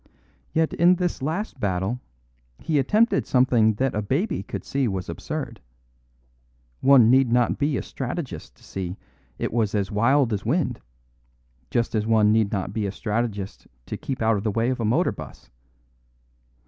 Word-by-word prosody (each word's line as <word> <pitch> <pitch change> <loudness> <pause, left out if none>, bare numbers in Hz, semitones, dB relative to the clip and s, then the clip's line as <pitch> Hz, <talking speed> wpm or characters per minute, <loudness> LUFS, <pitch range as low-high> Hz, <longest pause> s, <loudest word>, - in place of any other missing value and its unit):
Yet 160 0 +1
in 175 +2 +5
this 180 -4 -2
last 160 +3 -3
battle 100 +3 -1 0.6
he 155 -3 0
attempted 215 - +2
something 120 -4 +3
that 130 +3 0
a 105 - -1
baby 140 - -1
could - - -6
see 135 -2 0
was 95 -3 -3
absurd. - - -5 1.2
One 130 -4 +6
need 130 -2 +4
not 120 0 +2
be 145 -1 +1
a - - -3
strategist 125 - -6
to - - -24
see 95 0 -5 0.4
it - - -3
was 110 -3 +1
as 100 0 -1
wild 120 +3 +3
as 100 -1 -2
wind; 150 +7 0 0.9
just 115 -1 0
as 110 -1 0
one 110 -2 +4
need 110 -2 +2
not 95 -1 -2
be 105 -2 -1
a - - -3
strategist 105 -1 -3 0.2
to - - -5
keep 130 -4 -4
out 110 -1 +3
of 100 - -4
the 110 - 0
way 115 +4 +1
of 130 - -3
a 115 - -1
motor 140 +12 +2
bus. - - -11
115 Hz, 170 wpm, -24 LUFS, 105-135 Hz, 1.2 s, One